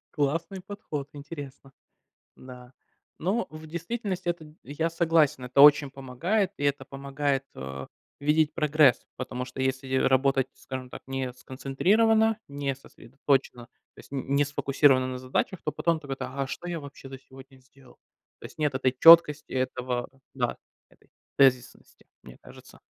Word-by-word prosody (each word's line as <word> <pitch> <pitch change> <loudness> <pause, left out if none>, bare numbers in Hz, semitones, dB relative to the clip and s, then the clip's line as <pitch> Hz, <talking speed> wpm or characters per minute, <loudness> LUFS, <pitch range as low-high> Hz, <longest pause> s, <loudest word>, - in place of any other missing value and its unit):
Классный 165 +6 -2
подход, 155 -8 -6
интересно. 145 -2 -10 0.6
Да, 125 -1 -13 0.5
но 190 +4 -1
в 155 +1 -10
действительности 185 +2 -4
это, 160 -3 -4
я 160 +4 -2
согласен, 165 -5 +2
это 125 +2 +2
очень 145 -1 +7
помогает, 155 - -1
и 145 - -3
это 140 -1 0
помогает, 140 0 -2
э, 65 0 -7 0.3
видеть 150 +1 +2
прогресс, 150 -5 +3
потому 125 -1 -5
что 130 +1 -8
если 130 0 -2
работать, 135 0 +2
скажем 130 -1 -8
так, - - -9
не 135 -1 -3
сконцентрированно, 210 - +1
не 140 -1 -3
сосредоточенно, 130 -1 -3
то - - -33
есть - - -18
н 135 0 -2
не 145 +1 +4
сфокусировано 140 -2 +2
на 130 0 -5
задачах, 130 +8 -2
то - - -1
потом 165 -2 0
так 140 -3 -12
это: 130 -1 -4
"А, 135 +2 -4
а - - -2
что 155 - -7
я 170 -2 -3
вообще 140 -1 -11
за 135 0 -9
сегодня 135 +1 -16
сделал?" 130 0 -21 0.4
То - - -8
есть - - -17
нет 150 -3 0
этой 130 -1 +1
чёткости, 165 -2 +7
этого 125 -1 -2 0.3
да, - - -1 0.3
этой - - -27 0.3
тезисности, 130 -3 +1 0.2
мне - - -13
кажется. - - -15
140 Hz, 155 wpm, -27 LUFS, 130-155 Hz, 0.6 s, очень